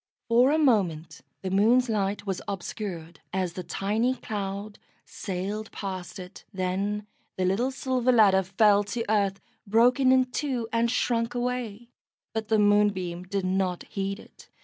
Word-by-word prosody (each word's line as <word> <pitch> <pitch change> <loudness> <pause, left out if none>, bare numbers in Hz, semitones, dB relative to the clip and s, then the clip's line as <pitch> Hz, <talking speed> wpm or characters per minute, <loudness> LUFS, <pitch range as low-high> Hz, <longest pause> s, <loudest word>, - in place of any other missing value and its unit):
For 240 +3 +5
a 305 - +3
moment 170 - +1 0.2
the 185 - -3
moon's 230 +6 +4
light 205 -2 -1
was 195 -2 -3
obscured, 180 -4 -5
as 185 -2 -1
the 185 - -5
tiny 215 +8 0
cloud 200 -2 -5 0.3
sailed 200 +4 -5
past 185 -3 -6
it; 180 0 -10
then 195 +3 -2 0.3
the 185 - +1
little 205 +8 +1
silver 255 -1 0
ladder 205 -5 +5
fell 200 +2 +3
to 230 +3 -3
earth, 200 -2 +1 0.3
broken 250 +5 +4
in 260 0 +5
two 250 -5 -2
and 230 0 +2
shrunk 235 -1 0
away, 240 -2 -3 0.4
but 220 -1 -3
the 220 - +3
Moonbeam 205 -4 +2
did 195 0 -2
not 185 -1 0
heed 195 +1 -3
it. - - -17
205 Hz, 150 wpm, -27 LUFS, 190-230 Hz, 0.4 s, For